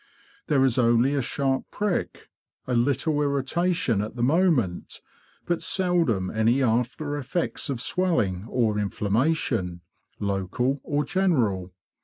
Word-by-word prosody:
There 135 -3 +3
is 130 -1 +2
only 120 +3 +3
a 140 - +1
sharp 135 +1 -1
prick, 205 -4 -3 0.3
a 125 - -2
little 140 +5 +1
irritation 140 - 0
at 105 +3 -5
the 120 - -2
moment, 140 - +1 0.5
but 175 -1 -1
seldom 170 - +1
any 115 +5 +2
after 125 +5 0
effects 145 +3 -3
of 135 -4 -2
swelling 115 - 0
or 110 -4 +1
inflammation, 105 - -1 0.4
local 100 +7 -1
or 145 0 -1
general. 125 - 0
130 Hz, 120 wpm, -25 LUFS, 110-155 Hz, 0.5 s, There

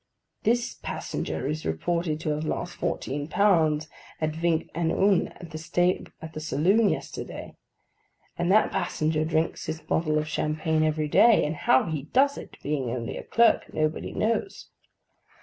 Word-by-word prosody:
This 240 +2 +1
passenger - - -4
is 155 +2 -3
reported 155 - -1
to - - -2
have 150 +1 -2
lost 175 +2 -3
fourteen 145 +2 -3
pounds 160 -5 +3 0.3
at 155 -1 0
Vingt 165 0 0
et 165 -1 0
un 195 +2 +2
in - - -13 0.8
the 155 - -6
saloon 190 +8 +3
yesterday; - - -5 0.8
and 175 +1 0
that 215 +2 +4
passenger 155 -4 0
drinks 160 +2 -1
his 160 0 -3
bottle 155 -1 0
of 155 0 -1
champagne 155 +1 0
every 155 -1 +1
day, 225 +9 +5
and 150 +2 -2
how 130 - +3
he 155 -4 -3
does 270 - +2
it - - -11
(being 140 -4 -1
only 115 -1 -4
a - - -5
clerk), 235 0 +3
nobody 155 0 -1
knows. 230 - -2
160 Hz, 150 wpm, -26 LUFS, 155-175 Hz, 0.8 s, day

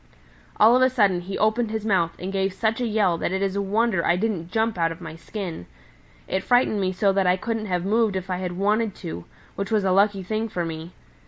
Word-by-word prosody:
All 225 +3 +7
of 255 - +3
a 255 - +5
sudden 205 -8 +2
he 190 +2 -5
opened 220 +2 +1
his 220 -1 -3
mouth 170 -6 +1
and 190 +2 -5
gave 195 -1 0
such 220 +4 -1
a 245 - 0
yell 205 -6 +1
that - - -1
it 190 +1 -1
is 195 -1 -1
a 200 - 0
wonder 205 -2 +1
I 170 - +3
didn't 180 -4 -2
jump 225 +3 0
out 165 -2 +1
of 165 - -8
my 160 - -8
skin. 165 - -6 0.6
It 190 - -1
frightened 245 -4 +2
me 185 -1 0
so 195 +1 +1
that 195 -1 +2
I 180 +1 +3
couldn't 225 +2 -3
have 180 -1 -1
moved 215 0 +2
if 190 0 -3
I 185 -1 -2
had 180 -1 -4
wanted 205 +3 0
to, 160 - -7 0.3
which 200 0 -3
was 215 -2 +1
a 190 - +2
lucky 200 0 +3
thing 220 +4 -2
for 175 -4 -2
me. 165 +1 -7
195 Hz, 245 wpm, -24 LUFS, 180-220 Hz, 0.6 s, All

